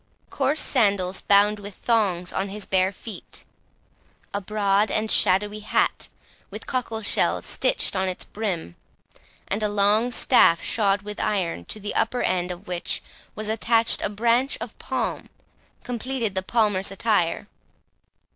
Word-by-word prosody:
Coarse 280 +3 +1
sandals, 200 -7 +2
bound 205 +1 +4
with 205 -1 -9
thongs, 195 -7 0
on 195 +1 -2
his 205 +1 -2
bare 190 0 +2
feet; 205 0 -9 0.9
a 200 - -2
broad 205 +1 +1
and 215 0 -1
shadowy 205 +3 +2
hat, 210 - 0 0.4
with - - -8
cockle 230 -4 -3
shells - - +1
stitched - - +1
on 190 0 0
its 185 - -3
brim, 180 - -4 0.7
and 205 +3 -2
a 210 - +1
long 205 +3 +2
staff 205 -9 +4
shod 200 -2 +1
with 210 0 -6
iron, 175 - -1
to 215 - -6
the 205 0 -4
upper 245 +2 0
end 180 -1 0
of 180 +3 -8
which 175 -2 -2 0.3
was 215 0 -3
attached 225 +1 +2
a - - -1
branch 235 +6 +1
of - - -7
palm, - - -3 0.5
completed 245 -2 -2
the 190 - 0
palmer's 205 -2 +1
attire. 195 -2 0
205 Hz, 145 wpm, -24 LUFS, 190-225 Hz, 0.9 s, bound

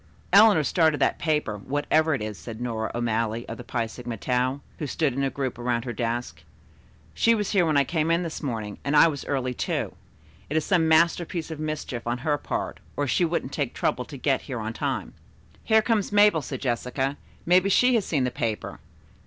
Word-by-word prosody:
"Eleanor 200 -5 +7
started 160 -1 +2
that - - +1
paper, 150 -9 0
whatever 145 +6 +1
it 125 - -4
is," 105 -1 -4
said 115 +2 -9
Nora 115 -3 -2
O'Malley 115 -1 -1
to - - -5
the 125 - -9
Phi 120 -1 -2
Sigma 115 +1 -7
Tau, 125 +5 0 0.2
who 150 - -3
stood 145 -1 0
in 140 +2 -1
a 135 - +1
group 130 -3 -4
around 120 -1 -1
her 120 - -3
desk. 120 -9 -3 0.7
"She 230 0 +3
was 210 -2 -2
here 185 -5 +3
when 155 -2 +2
I 140 - +5
came 160 +3 -1
in 170 +2 +2
this 165 -3 -5
morning, 110 -7 -4
and 140 +1 +2
I 165 - +8
was 145 -4 -3
early, 130 -3 -1
too. - - -2 0.6
It 155 - 0
is 160 - 0
some 175 -4 +3
masterpiece 165 +1 +2
of 155 - -6
mischief 155 -6 -4
on 120 +1 0
her 145 +3 -1
part, - - -4 0.2
or 145 - +1
she 145 - +1
wouldn't 170 +1 -2
take - - -2
the - - -9
trouble - - 0
to - - -9
get - - +1
here - - -3
on - - -4
time." - - -3 0.5
"Here 220 -1 +4
comes 215 -4 0
Mabel," 205 -5 +5
said 135 -2 -6
Jessica. 130 +2 -1 0.3
"Maybe 185 +3 +4
she 250 +6 +4
has 225 -4 +3
seen 145 -7 0
the 125 - 0
paper. 115 -3 -3
140 Hz, 210 wpm, -25 LUFS, 120-165 Hz, 0.7 s, I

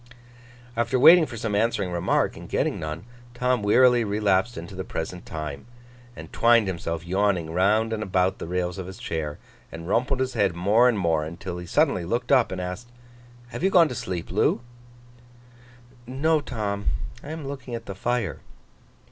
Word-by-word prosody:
After 120 +2 +1
waiting 165 +4 +8
for 115 - -8
some 110 -1 -3
answering 100 -3 0
remark, 85 -1 0
and - - -11
getting - - 0
none, 80 +4 -5 0.3
Tom 125 -1 +1
wearily 120 +3 +5
relapsed 105 +1 +1
into 85 +3 -8
the 95 0 -5
present 90 0 -6
time, 75 -1 -6 0.5
and - - -11
twined 115 -1 +4
himself 85 -3 -4
yawning 95 -3 0
round 105 +6 +2
and 110 - -3
about 95 -1 0
the - - -6
rails 90 +1 -2
of 90 - -6
his 95 0 -9
chair, 75 -3 -4 0.3
and 85 0 -8
rumpled 125 +6 +1
his 130 0 -1
head 100 -6 +1
more 105 +8 +4
and 115 - 0
more, 85 -5 +1
until 85 +3 -6
he 90 - -8
suddenly 140 - +2
looked 120 +9 -2
up, 130 -4 +4
and 95 - -4
asked: 90 +6 -5 0.6
'Have - - -7
you 190 - +4
gone 170 -4 +5
to - - -4
sleep, 90 -7 -5
Loo?' - - +2 1.5
'No, 150 +5 +1
Tom. 105 -6 -4 0.3
I - - -10
am 155 -3 -6
looking 130 -3 -6
at 115 -1 -7
the 100 - -6
fire. 115 -1 -2
100 Hz, 175 wpm, -25 LUFS, 90-120 Hz, 1.5 s, waiting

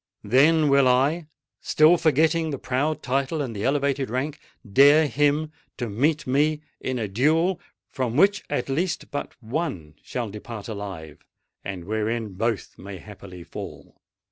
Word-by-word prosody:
Then 150 +8 +4
will 140 -1 +5
I—still 155 +4 +2
forgetting 160 +1 +2
the 140 - -3
proud 140 +5 -1
title 135 +4 -1
and 130 -6 -3
the 100 - -4
elevated 140 -1 0
rank—dare 140 +2 +2
him 145 +3 +1 0.3
to 120 -3 -3
meet 150 +8 +1
me 150 +4 +1 0.2
in 130 -1 -3
a 110 -3 -2
duel, 160 - +1 0.3
from 125 -2 -3
which 195 +3 +4
at 145 -4 -1
least 170 +5 -2
but 145 - -5
one 110 - -3
shall 120 -5 -4
depart 105 0 -8
alive, 95 -8 -7 0.4
and 95 -3 -6
wherein 110 +1 -2
both 110 +2 -3
may 100 +1 -8
haply 95 -3 -11
fall! - - -10
135 Hz, 140 wpm, -24 LUFS, 110-155 Hz, 0.4 s, will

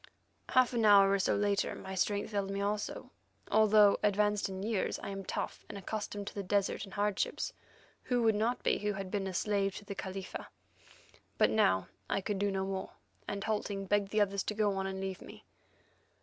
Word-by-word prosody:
Half 255 0 +4
an 235 -2 +1
hour 200 -2 +7
or 200 - +2
so - - +2
later 205 -1 +1
my 190 - -7
strength 200 +3 0
failed 200 -2 -1
me 195 0 -2
also. 205 +1 -3 0.4
Although 215 -1 +6
advanced 210 0 +2
in 190 0 -5
years, 215 -2 -1
I - - -4
am 195 0 -5
tough - - -4
and 210 - -6
accustomed 205 +1 -4
to - - -6
the 200 - -3
desert 200 +1 0
and 195 - -12
hardships; 205 -1 -1 0.5
who 245 -2 +1
would 225 -1 +5
not 225 +4 0
be - - +2
who 210 0 -1
had 195 -1 -5
been 200 -2 -1
a 190 - -4
slave 200 0 0
to 205 - -8
the 200 - -5
Khalifa? 190 -1 -6 0.9
But - - +4
now 95 -1 +3 0.2
I - - +1
could 195 0 -2
do 205 0 +1
no 190 -1 -1
more, 190 -1 -4 0.3
and 200 -1 -3
halting, 205 -2 -2
begged 200 0 +1
the 215 +1 +2
others 200 -1 +1
to 210 - -2
go 210 -1 +2
on 195 0 -2
and 190 0 -4
leave 190 -1 -4
me. - - -12
200 Hz, 205 wpm, -32 LUFS, 195-210 Hz, 0.9 s, hour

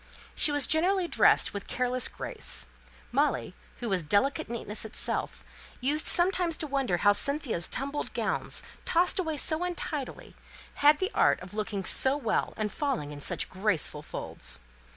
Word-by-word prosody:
She 300 - +4
was 290 -2 +4
generally 360 +3 +2
dressed - - +3
with 200 -1 -6
careless 250 0 +1
grace. - - 0 0.4
Molly, - - 0 0.3
who 240 - -2
was 190 -2 +1
delicate 205 - 0
neatness 225 -2 -4
itself, 220 - -3 0.3
used 290 +5 0
sometimes 355 -2 +2
to - - -3
wonder 270 -10 0
how 205 +3 +4
Cynthia's 265 - +3
tumbled 280 +3 -4
gowns, - - -1 0.2
tossed 355 +2 +2
away 320 -4 -2
so 315 +3 +2
untidily, 325 -6 -5 0.5
had 295 +1 +6
the 380 +6 -2
art - - +3
of 180 +1 -11
looking 210 -2 -3
so 265 +7 +3
well, 245 -7 -1
and 215 -1 -2
falling 265 - -2
in 145 -1 -9
such - - 0
graceful 185 -6 -1
folds. 65 - -3
265 Hz, 150 wpm, -28 LUFS, 205-310 Hz, 0.5 s, had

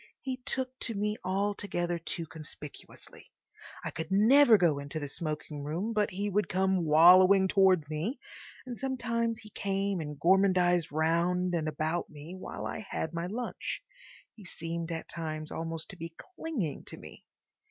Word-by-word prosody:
He 260 -2 -4
took 260 -1 -2
to 230 - -3
me 210 +1 0
altogether 185 -2 -1
too 165 0 -4
conspicuously. 150 -2 -11 0.6
I - - -2
could 160 0 -5
never 225 +5 +7
go 165 -6 +2
into 140 +2 -5
the 145 - -4
smoking 150 0 -4
room 175 +10 -2
but 210 -1 +2
he 200 +1 -3
would 205 +1 0
come 190 -1 +1
wallowing 185 +5 +7
towards 190 -5 +4
me, 160 - -3 0.5
and 245 -2 -6
sometimes 235 -3 -1
he 215 -2 -13
came 195 -1 -1
and 150 -2 -6
gormandised 180 -1 +3
round 170 +4 +1
and 160 -2 0
about 155 +3 -1
me 155 +3 -10
while 185 - -6
I - - -4
had 185 -5 -4
my 170 +1 -2
lunch. 240 - -4 0.5
He 215 - -14
seemed 165 -1 -5
at 165 -1 -4
times 155 -2 -5
almost 165 +1 -4
to 195 - -10
be 165 0 -7
clinging 315 - -4
to - - -8
me. - - -12
180 Hz, 160 wpm, -30 LUFS, 160-205 Hz, 0.6 s, never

